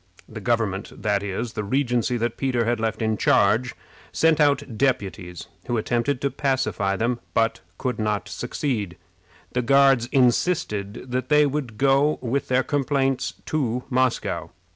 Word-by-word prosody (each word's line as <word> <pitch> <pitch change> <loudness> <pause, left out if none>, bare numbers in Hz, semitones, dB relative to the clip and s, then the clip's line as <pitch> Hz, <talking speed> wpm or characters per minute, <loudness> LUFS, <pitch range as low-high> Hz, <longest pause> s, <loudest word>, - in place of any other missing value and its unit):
The - - -8
government 105 -4 -2
that 105 -2 +1
is, 100 +4 -4
the 105 - -3
regency 125 +1 0
that 120 0 -1
Peter 125 -4 0
had 120 0 0
left 110 0 -1
in 110 -1 0
charge 110 +7 +3 0.4
sent 160 -1 +3
out 140 -5 +2
deputies, 100 - -2 0.2
who 120 - 0
attempted 120 +5 0
to 140 - 0
pacify 110 -8 0
them, 120 +3 -1 0.2
but 115 0 +2 0.2
could 125 -4 -3
not 105 -1 -1
succeed. 120 - -3 0.5
The 125 - 0
Guards 135 -1 +4
insisted 120 - 0
that 130 +1 -2
they 150 0 +5
would 135 -6 -3
go 140 +3 +3
with 130 +3 -2
their 130 +1 +2
complaints 135 -2 0
to 125 -5 -1
Moscow. 105 -10 0
120 Hz, 145 wpm, -24 LUFS, 110-135 Hz, 0.5 s, they